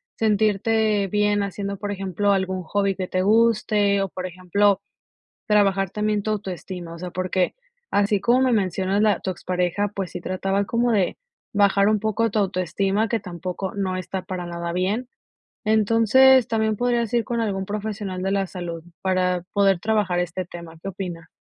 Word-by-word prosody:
sentirte 215 -1 +2
bien 205 +1 +1
haciendo, 200 0 -4
por 205 +1 -4
ejemplo, 195 0 0
algún 190 -1 -1
hobby 200 +3 0
que 185 -1 -4
te 185 - 0
guste. 210 -1 +3
O, 195 - -1
por 185 +1 -6
ejemplo, 185 +3 +1 0.7
trabajar 195 -3 +3
también 210 0 0
tu 215 - -1
autoestima, 185 -4 -5
o 170 - -10
sea, 180 -1 -6
porque, 185 0 -1 0.3
así 205 0 +2
como 240 +6 +3
me 260 -1 +3
mencionas 195 -1 +1
la 215 -1 +3
tu 190 - -2
expareja, 180 +3 -1
pues 195 -3 -3
sí, 180 - -5
trataba 195 +2 -1
como 235 +3 +1
de 200 -5 +1 0.4
bajar 200 0 +4
un 215 -1 +3
poco 220 +2 0
tu 215 - +1
autoestima, 195 +2 0
que 230 +1 0
tampoco 180 0 -5
no 190 -2 -1
está 185 +1 -4
para 185 -1 -5
nada 170 0 -4
bien. 200 +7 -1 0.6
Entonces, 225 +4 +5
también 220 -1 +1
podrías 240 -1 0
ir 235 -1 +2
con 235 -2 -2
algún 195 -4 -2
profesional 205 -2 -4
de 190 - 0
la 195 -1 +1
salud, 175 -3 -6 0.2
para 180 -2 +1
poder 195 -2 +3
trabajar 210 -5 +1
este 180 +1 -3
tema, 170 -2 -10
¿qué 195 - -6
opina? 180 -3 -6
195 Hz, 170 wpm, -23 LUFS, 185-215 Hz, 0.7 s, Entonces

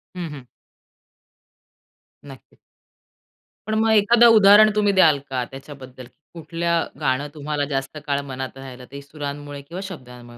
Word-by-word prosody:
हं, 175 -2 -5
हं. 135 -4 -11 1.8
नक्कीच. 135 -3 -15 1.1
पण 215 - -1
मग 225 0 +2
एखादं 235 +3 +5
उदाहरण 210 +1 +7
तुम्ही 205 -1 +2
द्याल 155 -5 +5
का 130 -2 -2
त्याच्याबद्दल 135 -2 -11 0.3
कुठलं 170 0 -2
गाणं 140 0 0
तुम्हाला 150 -1 -3
जास्त 135 +2 -4
काळ 140 0 0
मनात 130 +1 -6
राहिलं 130 -2 -11
ते 140 - -9
सुरांमुळे 145 0 -8
किंवा 170 +7 -8
शब्दांमुळे, 125 -8 -12
145 Hz, 125 wpm, -21 LUFS, 135-170 Hz, 1.8 s, उदाहरण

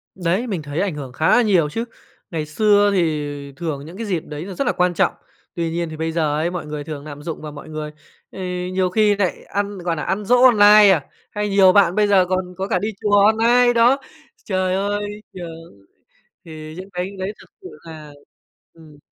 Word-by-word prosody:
Đấy, 185 +6 -1
mình 190 -8 -3
thấy 145 +2 -5
ảnh 190 -6 -1
hưởng 135 -3 -7
khá 155 +5 +1
là - - +5
nhiều 185 -9 +2
chứ. 225 +9 -3 0.5
Ngày 155 -2 -3
xưa 205 +5 +3
thì 145 -5 -2
thường 145 -2 -5
những 170 +4 -11
cái 225 - -4
dịp 185 -5 -1
đấy 150 +3 -7
nó 195 - -7
rất 260 +6 -2
là - - +2
quan 180 0 +1
trọng. - - +1 0.4
Tuy 170 -2 -2
nhiên 170 -1 -2
thì 155 - -8
bây 160 +1 -2
giờ 160 -3 0
ấy 165 +3 -1
mọi 175 -3 -5
người 150 -1 -6
thường 145 -1 -7
nạm 145 -1 -9
dụng 165 - -6
vào 150 -1 -7
mọi 145 - -11
người, 155 -1 -5 0.4
ờ, - - -10 0.3
nhiều 185 -1 +1
khi 210 +1 +3
nại 195 -3 -2
ăn, 205 0 -3
gọi 175 -2 -2
nà, 150 - -4
ăn 205 +2 -2
giỗ 245 +4 +4
online 210 -3 +7
à, 160 -8 +1 0.3
hay 210 -1 -2
nhiều 195 -2 +5
bạn 190 -2 +4
bây 210 -1 +3
giờ 195 -2 +4
còn 185 -1 -2
có 190 +1 -3
cả - - 0
đi 210 - -2
chùa 205 -1 +3
online, 235 +3 +4
đó. 240 +3 +4 0.5
Trời 185 -2 0
ơi, 205 +1 -3
trường 165 - -11 0.6
thì 155 -1 -9
những 185 +2 -9
cái 180 +2 -3
đấy 190 +2 -3
thực - - -17
sự 375 - -9
là 155 -3 -11 0.6
ừm. 160 -3 -17
180 Hz, 220 wpm, -20 LUFS, 155-205 Hz, 0.6 s, online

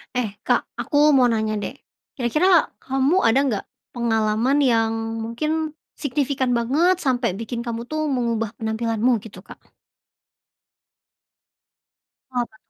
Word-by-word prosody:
Eh, 225 -5 -1
Kak - - +1
aku 300 0 +3
mau 255 -3 +5
nanya 220 -1 0
deh. 255 - -5 0.4
Kira-kira 305 +8 +3
kamu 270 +7 +1
ada 230 +3 +4
nggak 220 -7 -1 0.3
pengalaman 225 +2 +1
yang 230 -5 +3 0.3
mungkin 305 +8 -2 0.2
signifikan 280 -2 -1
banget 305 +10 +2
sampai 250 - 0
bikin 230 +2 -4
kamu 235 -1 -4
tuh 310 +3 -2
mengubah 230 -4 -1
penampilanmu 225 +1 0
gitu, 220 - -12
Kak? - - -13 2.7
Apa 245 -1 0
tuh? 220 - -23
245 Hz, 120 wpm, -22 LUFS, 225-280 Hz, 2.7 s, mau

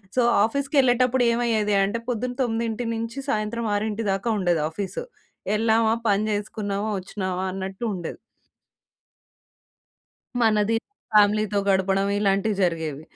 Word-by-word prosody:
So 255 - +4 0.2
ఆఫీస్‌కెళ్ళేటప్పుడు 260 -1 +2
ఏమయ్యేది 225 -3 +1
అంటే 205 +4 -1
పొద్దున 245 +1 -2
తొమ్మిదింటి 230 -1 -1
నుంచి 230 +3 -5
సాయంత్రం 220 0 -1
ఆరింటి 215 +1 -2
దాకా 195 +4 -1
ఉండేది 175 -4 +1
ఆఫీస్. 190 +3 -4 0.6
ఎళ్ళామా, 225 0 +3 0.2
పని 200 +1 +2
చేసుకున్నామా, 205 0 -2
వచ్చినామా 185 -1 -3
అన్నట్టుండేది. 190 -1 -4 2.2
మనది 220 -1 +3 0.4
ఫ్యామిలీ‌తో 210 0 +4
గడపడం 195 0 +2
ఇలాంటివి 200 +1 +1
జరిగేవి. 160 -5 -1
210 Hz, 100 wpm, -24 LUFS, 195-230 Hz, 2.2 s, So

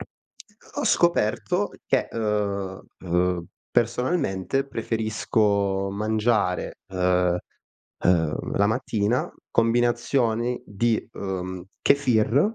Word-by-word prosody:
Ho 215 0 -12
ho - - -1
scoperto 175 - +2 0.2
che, - - +1
uhm, 100 -3 -1 0.2
uhm, 90 0 +1 0.2
personalmente 125 - 0
preferisco 110 -4 0
mangiare, 105 -2 0
uhm, 90 -1 +2 0.7
uhm, 80 -4 +1
la 100 - +4
mattina 110 0 0 0.2
combinazioni 120 +1 +1
di, 110 +2 0
uhm, 95 -2 -4 0.2
Kefir 140 - +3
110 Hz, 80 wpm, -25 LUFS, 95-120 Hz, 0.7 s, la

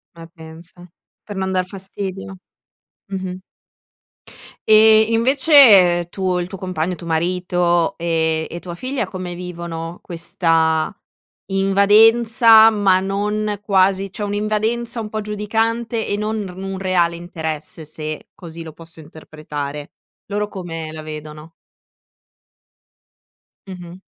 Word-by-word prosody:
Ma 165 0 -11
pensa! 160 +2 -13 0.5
Per 205 - -7
non 190 0 -2
dar 185 -1 0
fastidio, 195 0 -7 0.7
mh-mh. 185 -1 -5 1.3
E 220 0 +7
invece, 265 +7 +1 0.5
ehm, 175 0 -6
tu 185 -1 -1
il 175 - -3
tuo 195 - -8
compagno 180 -1 -3
tuo 170 - -11
marito 175 +1 0
e 160 -1 0
e 170 - -7
tua 175 -1 -8
figlia 255 +5 -3
come 185 -2 -7
vivono 170 -1 -7
questa 165 -2 0 0.6
invadenza, 220 +3 +5
ma 195 -3 +3
non 205 +1 -2
quasi 195 -1 +2
cioè 210 - -5
un'invadenza 215 +3 -2
un 215 - -6
po' 215 0 -4
giudicante 225 +2 -2
e 205 - -1
non 215 +1 -2
n 200 - -4
r 180 - -11
un 195 0 -5
reale 180 -3 +1
interesse, 160 -2 -6
se 155 0 -6
così 165 -1 -10
lo 160 -2 -10
posso 165 0 -13
interpretare. 150 -2 -8 0.4
Loro 210 +1 -1
come 165 -5 -7
la 155 0 -8
vedono? 155 +1 -9 2.2
Mh-mh. 180 -2 -10
185 Hz, 120 wpm, -19 LUFS, 165-210 Hz, 2.2 s, E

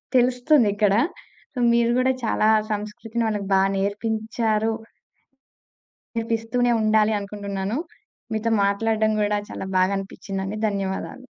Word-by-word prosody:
తెలుస్తుందిక్కడ. 245 -5 +3 0.8
మీరు 235 0 +3
కూడా 260 +1 +3
చాలా 220 -1 +2 0.2
సంస్కృతిని 215 +2 -3
వాళ్ళకి 205 -2 -2
బా 190 - +5 0.2
నేర్పించారు. 220 +2 -1 1.4
నేర్పిస్తూనే 230 +2 0
ఉండాలి 215 0 +3
అనుకుంటున్నాను. 200 +1 -4 0.6
మీతో 220 +1 0
మాట్లాడడం 220 +2 +1
గూడా 210 0 +1
చాలా - - -5
బాగా 185 +2 +3
అనిపిచ్చిందండి. 195 +1 -5
ధన్యవాదాలు. 200 +5 -4
215 Hz, 95 wpm, -23 LUFS, 200-230 Hz, 1.4 s, బా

